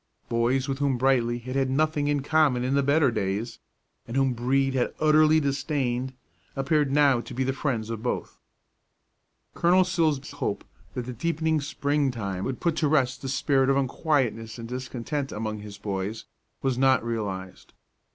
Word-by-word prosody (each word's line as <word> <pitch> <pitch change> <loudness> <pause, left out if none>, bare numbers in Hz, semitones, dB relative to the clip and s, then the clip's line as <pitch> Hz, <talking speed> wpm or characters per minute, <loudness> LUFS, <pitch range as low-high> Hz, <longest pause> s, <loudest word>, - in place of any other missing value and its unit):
Boys 120 +3 +1
with 135 -1 -2
whom 140 -3 +1
Brightly 120 -2 +2
had 130 +2 -6
had 135 -1 +1
nothing 150 +1 +1
in 145 -2 0
common 145 -5 +3
in 130 +2 0
the 140 - +3
better 140 0 +3
days, 105 +3 -2 0.5
and 115 - -3
whom 135 -1 +2
Brede 135 +3 +1
had 125 -2 0
utterly 155 0 +5
disdained, 135 -3 -1 0.4
appeared 140 +1 +1
now 140 -4 +4
to - - -9
be 130 - 0
the 135 +1 0
friends 120 -5 -2
of 115 -1 -4
both. 125 - -3 1.1
Colonel 180 +2 +4
Silsbee's 160 -6 0
hope - - -3 0.3
that 125 - -3
the 125 - -5
deepening 160 +3 0
spring 140 0 0
time 100 -6 -4
would 130 -2 -3
put 170 -3 0
to 155 - +2
rest 135 -3 +1
the 135 - -4
spirit 135 0 +2
of 135 - +3
unquietness 125 -5 0
and 115 -1 -7
discontent 130 +3 -4
among 110 0 -4
his 105 -1 -9
boys 100 +2 -4 0.4
was 130 -2 0
not 130 -3 +4
realized. 100 -5 -5
130 Hz, 170 wpm, -26 LUFS, 120-145 Hz, 1.1 s, utterly